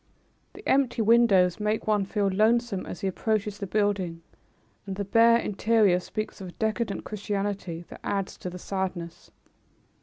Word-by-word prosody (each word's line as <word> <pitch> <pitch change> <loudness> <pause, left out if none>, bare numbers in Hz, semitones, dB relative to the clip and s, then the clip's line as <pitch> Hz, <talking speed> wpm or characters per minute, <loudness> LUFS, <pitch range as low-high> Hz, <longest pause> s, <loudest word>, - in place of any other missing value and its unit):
The 405 +2 -11
empty 260 -4 +2
windows 210 -6 +4
make 210 +1 -1
one 210 -2 +2
feel 200 +1 0
lonesome 215 +1 +1
as - - -7
he 195 - -1
approaches 210 +1 -1
the 200 - -4
building, 190 -5 -1 0.6
and 195 - -4
the 200 +1 -3
bare 230 +3 +5
interior 210 -3 +2
speaks 215 +2 -5
of 190 - -6
a - - -8
decadent 220 -1 -2
Christianity 200 -4 -4
that - - -10
adds 195 -1 -2
to 180 - -6
the 180 - -8
sadness. 180 -3 -5
205 Hz, 155 wpm, -27 LUFS, 190-220 Hz, 0.6 s, bare